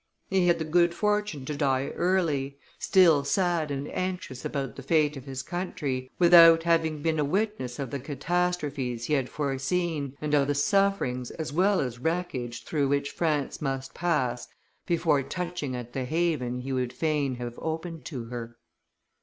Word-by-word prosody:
He 190 -2 +3
had 170 -1 +4
the 160 - -3
good 170 +2 +3
fortune 210 -9 0
to 150 - -3
die 135 -2 +1
early, 155 -7 0 0.2
still 170 -7 +5
sad 170 0 +1
and 140 0 -3
anxious 185 -8 -4
about 140 -2 -3
the - - -8
fate 150 -2 +2
of 135 -1 -9
his 135 -1 -5
country, 140 -7 -3
without 165 -2 +8
having 160 -3 +1
been 160 -1 +1
a - - +3
witness 185 - -1
of 135 -4 -4
the 140 - -3
catastrophes 145 -4 -2
he 150 - -1
had 135 -3 +1
foreseen 140 +1 -2
and 150 -1 -3
of 140 -2 +4
the 145 - 0
sufferings 145 -7 +1
as 160 -3 -5
well 190 +4 +3
as 125 -3 -4
wreckage 130 -6 -3
through 145 -3 0
which 140 0 0
France 150 -4 -1
must 135 -2 -3
pass 130 -9 -1 0.4
before 165 -4 +2
touching 175 -3 -4
at 120 -1 -7
the 130 -1 -2
haven 145 -5 -1
he 135 +1 -4
would 125 -1 -1
fain 145 -2 0
have 120 -1 -6
opened 160 0 -4
to 130 -7 -5
her. 120 0 -7
150 Hz, 170 wpm, -27 LUFS, 135-170 Hz, 0.4 s, without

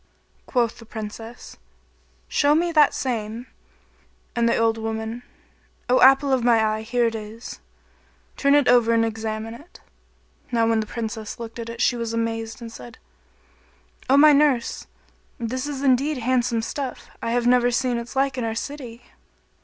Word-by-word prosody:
Quoth 235 -3 0
the 230 - -12
Princess, 225 +2 -8 0.7
"Show 290 +1 +3
me 340 +2 +1
that 305 -3 +4
same"; 230 -2 -3 0.9
and 235 -1 +2
the - - +2
old 225 0 +1
woman, 220 +1 -4 0.7
"O 250 - +4
apple 270 +1 +6
of 255 -2 +1
my 230 -2 +4
eye, 215 0 -1
here 235 +2 0
it 230 - 0
is, 220 +1 -8 0.8
turn 280 0 +3
it 290 -3 +3
over 230 -2 +4
and 225 0 +3
examine 220 0 -4
it." 300 +9 -14 0.7
Now 230 -2 +2
when 225 -1 +2
the 215 - -3
Princess 225 0 -5
looked 230 0 -8
at 230 0 -5
it 230 0 -6
she 245 - +3
was 230 -1 -3
amazed 225 0 -3
and 230 - -8
said, 235 0 -11 1.1
"O 270 - +5
my 300 +1 +8
nurse, 280 -5 +1 0.5
this 255 +4 -3
is 280 -2 -5
indeed 275 +3 +2
handsome 240 -2 0
stuff: 265 +1 -5
I 230 - -2
have 245 0 +1
never 245 0 +4
seen 245 0 0
its 235 +3 -9
like 270 -1 +1
in - - -2
our 225 -1 -2
city." 245 -2 -6
235 Hz, 165 wpm, -23 LUFS, 225-260 Hz, 1.1 s, my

